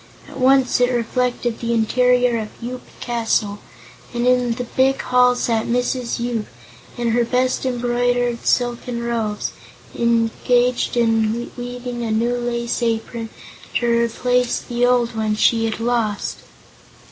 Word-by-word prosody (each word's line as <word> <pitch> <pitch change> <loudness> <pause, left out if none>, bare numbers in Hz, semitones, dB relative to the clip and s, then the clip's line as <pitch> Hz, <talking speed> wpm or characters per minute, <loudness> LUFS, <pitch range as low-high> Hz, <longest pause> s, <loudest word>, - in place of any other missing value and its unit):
At - - -10
once 260 -1 +4
it 245 - +4
reflected 245 0 -1
the 235 0 -1
interior 245 +1 +3
of 215 - -4
Yoop 250 +1 -6 0.2
Castle, 225 -4 0 0.6
and 240 0 0
in 250 -1 +3
the 245 +1 -4
big 260 +2 +1
hall 250 0 +3
sat 230 -2 0
Mrs. 245 0 -1
Yoop, 235 -3 -2 0.5
in 240 -1 0
her 240 +1 +2
best 255 +2 0
embroidered 245 -1 0
silken 240 -1 0
robes, 225 -3 -2 0.4
engaged 240 +2 +1
in 225 0 +1
weaving 245 0 -5
a 230 - -2
new 230 +3 +1
lace 240 0 -2
apron 230 0 -2 0.5
to 240 - +1
replace 240 +1 +1
the 240 0 -1 0.3
one 215 -1 -1
she 225 +1 +3
had 220 0 -2
lost. 230 -3 -1
240 Hz, 130 wpm, -20 LUFS, 230-245 Hz, 0.6 s, once